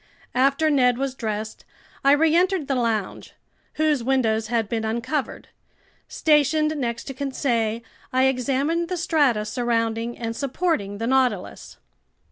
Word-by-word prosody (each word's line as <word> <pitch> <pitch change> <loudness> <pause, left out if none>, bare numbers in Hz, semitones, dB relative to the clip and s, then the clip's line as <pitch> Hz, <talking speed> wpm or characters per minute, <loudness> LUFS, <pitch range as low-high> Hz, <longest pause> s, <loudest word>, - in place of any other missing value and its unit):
After 275 +4 +2
Ned 250 -4 +3
was 270 0 -2
dressed, 215 -3 -5 0.4
I 275 +1 +6
reentered 325 +2 +2
the 275 - 0
lounge, 230 -5 -2 0.4
whose 305 -5 +1
windows 225 -4 +1
had 230 -2 0
been 225 +1 -2
uncovered; 235 +6 -3 0.6
stationed 305 0 +2
next 235 -5 -3
to 270 - -7
Conseil, 240 -5 -1 0.3
I 260 0 +2
examined 275 +6 0
the 365 - -2
strata 290 -11 +2
surrounding 230 -1 -1
and 230 -1 -4
supporting 275 - -1
the 225 - -3
Nautilus. 250 -6 -1
260 Hz, 125 wpm, -23 LUFS, 230-290 Hz, 0.6 s, I